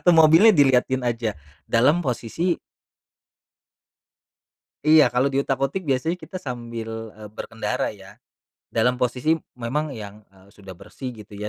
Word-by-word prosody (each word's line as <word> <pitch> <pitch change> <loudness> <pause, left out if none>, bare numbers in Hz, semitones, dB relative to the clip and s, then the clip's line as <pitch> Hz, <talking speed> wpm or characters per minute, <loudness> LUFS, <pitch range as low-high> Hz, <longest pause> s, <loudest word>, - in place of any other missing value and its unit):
Atau 175 - +4
mobilnya 160 +8 +7
diliatin 130 -2 +3
aja 115 -3 -1 0.3
dalam 145 +9 +3
posisi 155 +5 -1 2.3
Iya 155 -4 +6
kalau 130 +3 +1
diutak-atik 135 +5 -1
biasanya 150 +7 0
kita - - -8
sambil, 115 -7 -6
eee, 105 -1 -10
berkendara 110 -1 -3
ya 95 -2 -15 0.5
dalam 125 +2 +2
posisi 125 +6 +1 0.2
memang 140 +5 -2
yang, 105 -2 -9
eee, 95 0 -22
sudah 95 -4 -12
bersih 125 +6 -8
gitu 105 -1 -13
ya, 105 +1 -4
125 Hz, 125 wpm, -23 LUFS, 110-145 Hz, 2.3 s, mobilnya